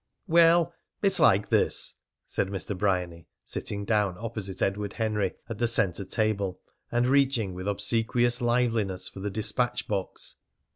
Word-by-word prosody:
"Well, 170 0 +5 0.3
it's 195 -2 +3
like 100 +2 +4
this," - - +3 0.3
said - - -1
Mr. 100 +1 -4
Bryany, 90 -4 -1 0.2
sitting 100 -1 -4
down 105 -4 +1
opposite 110 -4 -5
Edward 100 0 -1
Henry 105 -4 -1
at 115 -3 -6
the 120 - +2
centre 100 -4 +2
table, 100 -2 -1 0.3
and 120 +1 +2
reaching 130 -7 +2
with 95 +2 -6
obsequious 115 +4 0
liveliness 115 -6 0
for - - -9
the 100 +2 -3
despatch 110 +4 0
box. 100 -3 -3
105 Hz, 140 wpm, -27 LUFS, 95-120 Hz, 0.3 s, Well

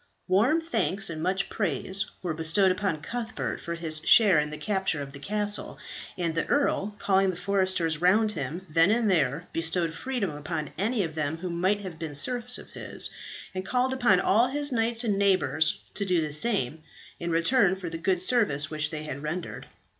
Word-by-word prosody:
Warm 220 - +3
thanks 195 - 0
and 155 -1 -5
much 190 +3 0
praise 190 0 0 0.2
were 175 -3 -1
bestowed 165 +5 +3
upon 185 -5 -1
Cuthbert 230 +3 -4
for 170 - -4
his 160 -2 -1
share 200 -8 +7
in 150 0 -1
the 150 - -7
capture 190 -6 -1
of 140 -1 -6
the 140 - -9
castle, 205 +5 -1 0.4
and 170 -3 -1
the 165 - -1
earl, 215 -8 +1
calling 195 -1 +2
the 185 - -2
foresters 185 -4 0
round 210 +5 +4
him, 160 +1 -5
then 165 +3 +4
and 220 -1 +2
there 155 -1 +1
bestowed 165 0 0
freedom 245 -5 -3
upon 150 0 -5
any 210 +3 0
of 160 -2 -4
them 155 0 -2
who 180 +1 -5
might 190 +4 +1
have 180 -5 -8
been 155 -3 -5
serfs 245 - -1
of - - -13
his, - - -4 0.4
and 185 0 -3
called 255 +5 0
upon 240 -8 +3
all 225 +7 +3
his 290 +2 -2
knights 230 0 +1
and 205 -4 0
neighbours 185 -5 +2
to 205 - -2
do 180 -3 +2
the 155 -2 -2
same, 155 - 0 0.4
in 170 - -3
return 190 +4 +3
for 190 -2 -7
the 165 0 -5
good 180 +1 +1
service 170 - +1
which 155 -1 -1
they 155 -1 -5
had 140 -2 -6
rendered. 160 +4 -5
185 Hz, 190 wpm, -27 LUFS, 160-210 Hz, 0.4 s, share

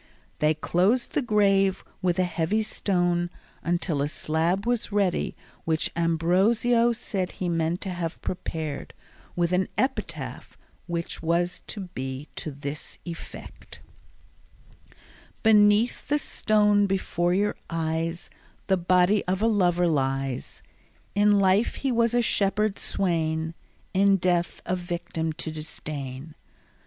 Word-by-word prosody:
They 155 +1 +3
closed 190 +10 +1
the - - +2
grave 195 -4 +3 0.2
with 180 -1 +1
a 185 - +3
heavy 175 +5 0
stone 175 -4 0 0.3
until 170 -3 0
a 145 - +1
slab 165 +6 0
was 240 -3 0
ready 200 -3 +1 0.3
which 160 -1 0
Ambrosio 190 +9 +3
said 205 -6 -3
he 185 - -3
meant 165 0 0
to 190 - -2
have 175 -2 -4
prepared, 160 -5 -4 0.4
with 175 0 +1
an 185 +1 +2
epitaph 260 - -3 0.3
which 170 -1 -3
was 175 +2 0
to 210 - -5
be 130 +2 -5
to - - -4
this 140 +1 -5
effect: 170 -2 -9 1.6
Beneath 210 +1 +4
the 295 - +2
stone 210 -6 +2
before 180 -2 0
your 205 +2 +1
eyes 165 +1 -2 0.3
The 190 - +2
body 180 +3 +3
of 185 +1 0
a - - +5
lover 180 -5 +3
lies; 135 -4 -1 0.5
In 205 0 +4
life 195 +3 +3
he 270 - -1
was 235 0 +2
a 240 - +3
shepherd 210 -1 +1
swain, 160 -3 0 0.4
In 195 +1 +4
death 175 -2 0
a 185 - 0
victim 170 -2 -3
to 160 0 -5
disdain. 150 -2 -6
180 Hz, 125 wpm, -26 LUFS, 165-205 Hz, 1.6 s, a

